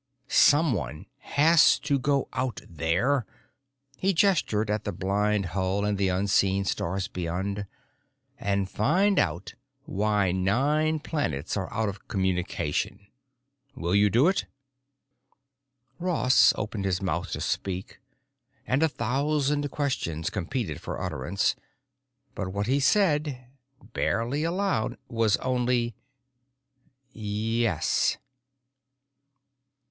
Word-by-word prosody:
Someone 105 - +3
has 160 +3 +5
to 140 -1 0
go 140 0 +1
out 130 -2 -2
there——" 95 - +1 0.7
he 195 +1 +1
gestured 160 - +2
to 105 0 0
the 105 - -3
blind 100 +2 0
hull 95 +1 0
and 105 -1 -1
the 100 - +2
unseen 95 +1 +2
stars 95 +1 -2
beyond—"and 100 +2 -5
find 175 - +2
out 90 +3 -1 0.3
why 105 - +1
nine 140 - +1
planets 85 - -2
are 95 -3 -3
out 110 -1 -1
of 100 -1 -7
communication. 95 -3 -2 0.7
Will 85 +1 -2
you 100 +1 +5
do 120 - +4
it?" 190 - +1 1.5
Ross 170 -8 +4
opened 105 -2 -3
his 95 -2 0
mouth 95 -3 -2
to - - -3
speak, 95 +4 -3 0.7
and 130 +3 +1
a 160 - +4
thousand 145 +3 0
questions 125 - -2
competed 100 - -3
for - - -5
utterance. 85 +10 -1 0.8
But 95 - -4
what 100 +1 -2
he 135 +5 +2
said, 150 - +1 0.4
barely 125 +7 0
aloud, 180 - -1
was 115 -3 +2
only: 125 -2 0 1.2
"Yes." 110 +2 0
110 Hz, 105 wpm, -27 LUFS, 95-140 Hz, 1.5 s, has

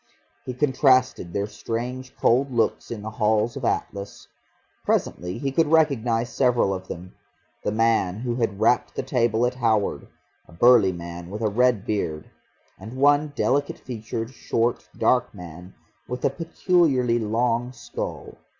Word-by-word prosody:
He 125 - -4
contrasted 130 - +2
their 100 +2 -1
strange 120 +5 -5
cold 130 +3 +2
looks 115 -2 0
in 110 -3 -6
the 110 - -5
Hall 110 0 +2
of 135 - -6
Atlas.... 100 -3 -3 0.6
Presently 90 +1 -1
he 140 -2 -2
could 160 +4 +2
recognise 125 -7 +2
several 120 -6 +2
of 95 0 -6
them; 90 +1 -8 0.5
the - - 0
man 110 -3 +1
who 120 -1 -2
had 105 -5 -1
rapped 115 +3 +2
the - - -2
table 120 -3 +1
at 125 - 0
Howard, 110 -5 0 0.4
a - - -17
burly 115 +1 +5
man 85 0 -8
with 105 +3 -5
a 110 - +2
red 120 -1 +2
beard, 80 -8 -3 0.5
and 110 +7 -9
one 145 +2 +3
delicate 140 +1 0
featured, 115 -1 -5
short, 120 -1 -1
dark 125 -3 +2
man 90 0 -11 0.3
with 125 0 -4
a - - +3
peculiarly 160 -8 +1
long 120 +2 0
skull. 120 -2 -7
115 Hz, 150 wpm, -24 LUFS, 105-130 Hz, 0.6 s, burly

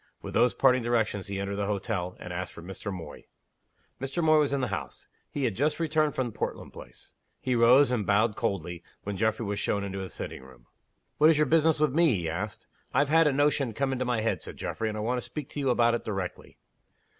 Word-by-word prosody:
With - - -6
those 120 -5 +3
parting 125 +4 +4
directions 115 -4 0
he 100 0 -3
entered 100 0 -3
the 100 -1 -1
hotel, 100 -3 -2
and 90 - -7
asked 90 0 -4
for 85 - -10
Mr. 95 +3 -6
Moy. 90 -3 -8 0.8
Mr. 135 +6 -2
Moy 155 -1 +5
was 145 -2 +2
in 140 - +1
the 125 -3 -1
house; 100 - -6 0.2
he 145 - -3
had 115 -6 0
just 150 - 0
returned 155 -2 +1
from 125 -3 -1
Portland - - -5
Place. - - -13 0.3
He 130 - -1
rose, 125 +3 +6
and 120 -4 +1
bowed 105 +2 +2
coldly, 85 -2 -2 0.2
when 100 0 -4
Geoffrey 110 +3 0
was 100 0 -2
shown 100 -1 0
into 95 -1 -4
his 95 -1 -7
sitting - - -6
room. 65 -2 -16 0.5
"What 155 +1 +7
is 160 - +4
your 150 - +4
business 160 +1 +3
with 150 -3 +2
me?" 160 -5 +4
he 85 -3 -2
asked. 95 +6 -4 0.3
"I've 140 +2 +2
had 165 0 +5
a - - +4
notion 140 -3 +1
come 135 +1 0
into 130 -1 -1
my 125 -3 0
head," 110 - 0
said - - -10
Geoffrey. 110 - -3
"And 110 - -4
I - - -3
want 125 +3 0
to - - -6
speak 150 +3 -6
to - - -6
you 135 -2 +1
about 120 -1 +3
it 120 - -1
directly." 95 -4 -5
115 Hz, 235 wpm, -28 LUFS, 100-140 Hz, 0.8 s, What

